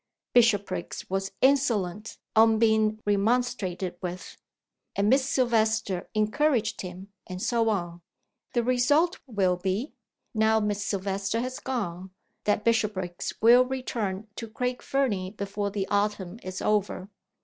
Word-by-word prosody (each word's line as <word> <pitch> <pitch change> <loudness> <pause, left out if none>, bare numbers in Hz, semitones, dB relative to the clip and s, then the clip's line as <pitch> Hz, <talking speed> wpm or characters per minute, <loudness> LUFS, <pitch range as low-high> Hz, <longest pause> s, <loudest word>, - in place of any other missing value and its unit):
Bishopriggs 210 -5 +2
was 195 0 -1
insolent 220 -8 +1 0.2
on 220 0 +6
being 220 -1 +3
remonstrated 200 -4 0
with, 180 0 -6 0.6
and 200 +2 +2
Miss 265 0 +3
Silvester 220 -6 +1
encouraged 220 +2 +1
him 185 +2 -8 0.2
and 180 0 -6
so 230 +2 +1
on. 175 -4 -2 0.5
The 240 - +2
result 290 +9 +2
will 190 -6 +1
be 195 - -2 0.4
now 220 0 +3
Miss 205 -1 -1
Silvester 195 +2 -1
has 255 +1 -4
gone 190 -8 -4 0.4
that 210 0 +1
Bishopriggs 210 -6 0
will 240 +2 +8
return 230 -6 -3
to 230 - -5
Craig 250 +3 -3
Fernie 220 -10 0
before 200 0 -2
the 195 -1 -3
autumn 205 -1 -1
is 185 0 -6
over. 205 -3 0
210 Hz, 125 wpm, -27 LUFS, 195-235 Hz, 0.6 s, will